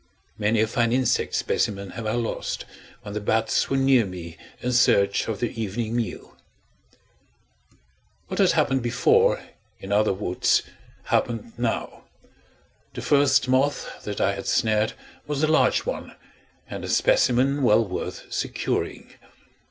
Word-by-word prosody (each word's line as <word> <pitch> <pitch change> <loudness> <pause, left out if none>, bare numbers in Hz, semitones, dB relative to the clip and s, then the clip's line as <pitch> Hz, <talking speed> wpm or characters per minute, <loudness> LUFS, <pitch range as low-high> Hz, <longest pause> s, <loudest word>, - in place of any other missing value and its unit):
Many 105 +1 +2
a - - +4
fine 115 +1 0
insect 125 -1 +1
specimen 100 -2 -1
have 115 -2 -6
I 110 - 0
lost, 120 -2 -3 0.4
when 100 - -7
the 105 - -3
bats 110 +2 +1
were 135 - +1
near 135 -2 +4
me 90 -4 -8 0.2
in 125 - -2
search 100 -5 +3
of 110 -3 -3
their 120 - -1
evening 110 +1 -3
meal. 115 -6 -4 1.9
What - - -5
had - - +4
happened 135 -1 +2
before, 120 0 +3 0.4
in 95 - -8
other 105 +1 +3
woods, 95 -2 +1 0.4
happened 115 -1 -1
now. 120 -1 -3 0.9
The - - -5
first 140 -3 +3
moth 135 +3 0
that 105 -1 -5
I 100 - +2
had 100 - -6
snared 110 0 +1 0.3
was 150 0 -2
a - - +4
large 155 +1 +3
one, - - -5 0.5
and - - -7
a - - -5
specimen 140 - +3
well 115 -2 +4
worth 90 -2 -5
securing. - - -3
115 Hz, 140 wpm, -24 LUFS, 105-130 Hz, 1.9 s, a